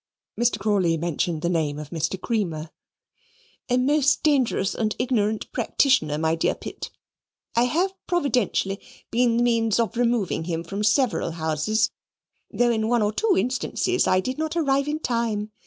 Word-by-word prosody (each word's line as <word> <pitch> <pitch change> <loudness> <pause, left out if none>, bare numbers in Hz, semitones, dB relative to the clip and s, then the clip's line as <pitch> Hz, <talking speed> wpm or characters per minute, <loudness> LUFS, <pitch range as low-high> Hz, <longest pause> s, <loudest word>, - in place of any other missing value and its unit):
Mr. 240 -2 +1
Crawley 195 -5 +1
mentioned 170 0 -2
the - - +1
name 160 -4 0
of 150 -1 -8
Mr. 170 +3 -2
Creamer. 170 -8 -2 1.0
"A 250 - +3
most 280 +2 +2
dangerous 260 -9 +2
and 215 -1 -1
ignorant 220 -4 0
practitioner, 255 - +2
my 160 +1 +1
dear 165 - 0
Pitt. - - -7 0.7
I 235 +1 +4
have 355 +9 0
providentially 250 - 0 0.3
been 235 0 +2
the 240 - +3
means 230 -2 +2
of 230 0 0
removing 235 -8 0
him 165 -1 -3
from 200 +4 -4
several 220 - +1
houses: 160 +7 0 0.6
though 240 0 +2
in 220 -1 0
one 235 -1 +2
or 210 +1 0
two 440 - +2
instances 260 - 0
I 185 0 +3
did 255 +7 -4
not 315 +1 -2
arrive 280 -3 +1
in 300 +1 -1
time. 230 -6 -1
220 Hz, 155 wpm, -24 LUFS, 175-250 Hz, 1.0 s, I